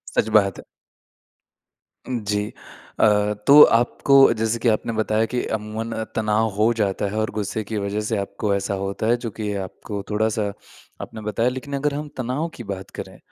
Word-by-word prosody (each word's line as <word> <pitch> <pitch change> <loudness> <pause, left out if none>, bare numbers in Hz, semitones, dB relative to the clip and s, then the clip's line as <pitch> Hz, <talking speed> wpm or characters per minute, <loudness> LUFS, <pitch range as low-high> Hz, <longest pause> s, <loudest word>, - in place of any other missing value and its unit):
सच - - +2
बात 100 -2 -2
है। - - -9 1.4
जी, 105 -4 -1 0.5
अ, 105 -1 +4
तो 145 +2 +10
आपको 120 +4 +3 0.2
जैसे 110 +1 -1
कि 120 - 0
आपने 110 +1 0
बताया 110 0 +1
कि 125 - 0
अमूमन 110 +2 -5
अ, 110 0 -2
तनाव 110 0 +1
हो 110 +3 +3
जाता 105 -3 -1
है 105 - -4
और 110 - 0
गुस्से 105 +1 -3
की 110 +1 -4
वज़ह 100 +1 -2
से 110 - 0
आपको 100 +1 -2
ऐसा 100 0 -2
होता 100 +2 -2
है 120 +1 +3
जो - - -1
कि 105 -1 -4
आपको 100 +2 -7
थोड़ा-सा 105 -1 0 0.5
आपने 110 - -8
बताया, 105 +3 0
लेकिन 130 +3 -7
अगर 140 +1 0
हम 150 +1 -4
तनाव 130 +6 -2
की 120 - -8
बात 95 -3 -6
करें - - -8
110 Hz, 180 wpm, -22 LUFS, 105-115 Hz, 1.4 s, तो